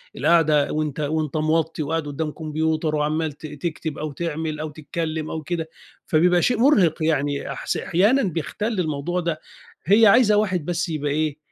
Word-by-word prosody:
القعدة 155 -4 +3
وأنت 155 -1 -2
وأنت 155 0 -1
موطّي 160 0 0
وقاعد 160 0 -2
قدّام 150 +2 -3
كمبيوتر 155 0 -1
وعمّال 155 +1 0
ت 150 - -12
تكتب 155 +1 -5
أو 155 0 -4
تعمل 155 0 -3
أو 155 - -4
تتكلّم 155 +1 -4
أو 160 - -4
كده، 165 0 -3 0.4
فبيبقى 175 +2 +3
شيء 245 - +2
مُرهق، 195 - +3
يعني 145 -3 0
أحس 140 - -3
أحيانا 210 +10 +2
بيَختَل 200 +5 -2
الموضوع 160 +1 -1
ده. 170 -3 -2 0.5
هي 210 +5 +6
عايزة 210 0 +5
واحد 185 -7 0
بس 175 +1 -2
يبقى 150 -2 -2
إيه، 155 0 -1
160 Hz, 160 wpm, -23 LUFS, 150-175 Hz, 0.5 s, هي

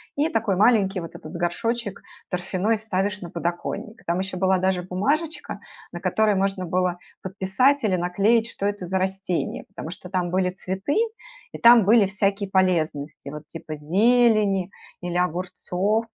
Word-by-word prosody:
и 300 +3 +1
такой 220 - 0
маленький 200 -2 +3
вот 165 - -8
этот 155 - -10
горшочек 200 +5 -2 0.3
торфяной 190 +4 0
ставишь 205 -1 -2
на 175 - -7
подоконник. 175 +6 -4
Там 170 +1 +1
еще 190 -1 -3
была 190 0 +3
даже 185 -1 +1
бумажечка, 285 - -2 0.3
на - - -6
которой 215 -1 +2
можно 195 -1 0
было 180 +1 0 0.2
подписать 195 +9 +1
или 195 -4 +2
наклеить, 200 +6 +2
что 200 - -4
это 205 -3 -2
за 190 - 0
растение, 190 -1 -2
потому 160 - -8
что 180 0 -10
там 180 -2 -1
были 185 0 +2
цветы, 190 +7 -3 0.6
и - - -7
там 235 -1 +7
были 215 +2 +5
всякие 195 0 -1
полезности, 160 -7 0
вот 150 +1 -7
типа 160 -1 -7
зелени 200 +3 +3 0.3
или 175 0 -3
огурцов. 180 +4 -1
190 Hz, 150 wpm, -24 LUFS, 180-215 Hz, 0.6 s, там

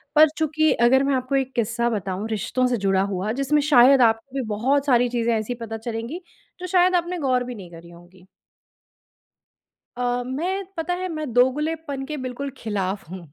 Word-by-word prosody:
पर 310 +1 +7
चूँकि 315 0 +2
अगर 260 +3 +5
मैं 275 0 +1
आपको 255 +1 -2
एक 265 -1 -1
किस्सा 235 0 0
बताऊँ 200 -2 -3
रिश्तों 225 +4 -1
से 250 -1 0
जुड़ा 195 -2 +1
हुआ 195 +3 -2
जिसमें 295 +2 +2
शायद 270 -2 +6
आपको 225 +3 +1
भी 270 - 0
बहुत 260 +7 +1
सारी 245 -3 +3
चीजें 235 -1 0
ऐसी 220 +3 -3
पता 225 -2 -6
चलेंगी 230 +8 -5 0.4
जो 365 - -5
शायद 365 0 +3
आपने 350 +1 -1
गौर 255 -4 +1
भी 250 0 -7
नहीं 185 -5 -11
करी 170 0 -12
होंगी। 175 +2 -17 1.7
अ, 245 0 -1
मैं 355 +10 -3
पता 325 +2 -1
है 365 +1 -3
मैं 310 -5 -4
दोगलेपन 285 +3 0
के 300 +1 -5
बिल्कुल 260 +1 -5
ख़िलाफ़ 200 -4 -3
हूँ। 185 +1 -7
250 Hz, 180 wpm, -23 LUFS, 225-295 Hz, 1.7 s, पर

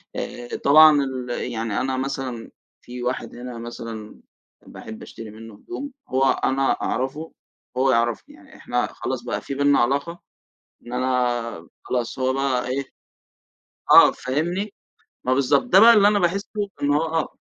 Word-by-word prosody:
آآ، 120 0 -5 0.2
طبعًا 150 0 +7
ال 130 -2 -5
يعني 115 -2 -2
أنا 130 0 -1
مثلًا 130 -3 -4 0.3
في 125 0 -8
واحد 125 +1 -3
هنا 120 0 -7
مثلًا 115 -2 -8 0.5
باحب 110 0 -10
أشتري 110 -2 -10
منّه 110 +1 -11
هدوم، 280 - -7 0.2
هو 130 +1 +1 0.2
أنا 135 0 +2
أعرفه 140 +5 -3 0.5
هو 130 +1 +3
يعرفني، 120 - -1
يعني 300 -3 -18
إحنا 125 0 -1
خلاص 130 -2 -4
بقى 120 - -3
في - - -6
بنا 145 +1 +3
علاقة 140 +8 0 0.7
إن 120 - -7
أنا 120 -7 -1 0.2
خلاص 125 +1 -3
هو 130 0 +1
بقى 135 -2 0
إيه، 135 +2 -2 1.1
آه، - - +9
فاهمني 175 +10 -3 0.5
ما 130 - +2
بالضبط 130 -1 +2
ده 245 -7 +5
بقى 230 +3 +9
اللي 205 -2 +6
أنا 205 0 +3
باحسه 195 +2 0 0.3
إن 145 - +2
هو 150 - +2
آه. 160 -1 -2
130 Hz, 150 wpm, -23 LUFS, 120-150 Hz, 1.1 s, آه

